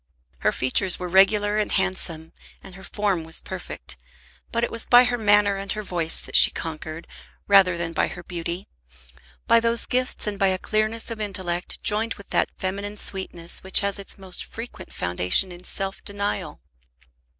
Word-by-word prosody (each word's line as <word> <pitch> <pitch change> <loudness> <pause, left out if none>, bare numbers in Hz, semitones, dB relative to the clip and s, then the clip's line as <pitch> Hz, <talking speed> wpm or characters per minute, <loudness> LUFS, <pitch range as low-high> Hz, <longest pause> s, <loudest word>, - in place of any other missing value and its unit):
Her - - +2
features 170 +9 +2
were 180 - -5
regular 205 +3 +3
and 210 - -1
handsome, 180 -4 -1 0.3
and 190 - -12
her 190 - -12
form 195 -3 -1
was 160 0 -2
perfect; - - -7 0.5
but 235 0 -1
it - - -1
was 230 - +1
by 245 0 +8
her 245 -1 0
manner 205 -1 +3
and 195 0 -5
her 215 - -5
voice 170 -4 +1
that - - -7
she - - +9
conquered, 160 0 -7 0.4
rather 190 -3 +5
than 170 -1 -4
by - - +1
her 175 - -9
beauty, 170 +1 -5 0.8
by 230 0 +5
those 230 0 +1
gifts 255 0 -1
and 205 -2 -4
by 195 - +3
a 190 -1 +1
clearness 215 +4 -1
of 225 - -6
intellect 180 -4 -4
joined 220 +2 +2
with 200 - -15
that - - +2
feminine 200 +2 -4
sweetness 175 -4 -3
which 190 - +3
has 200 -1 -1
its 195 - -1
most 190 -2 -3
frequent 230 +2 -10
foundation 90 - +3
in 175 0 -12
self 195 +1 -3
denial. 200 - -4
195 Hz, 175 wpm, -23 LUFS, 175-210 Hz, 0.8 s, she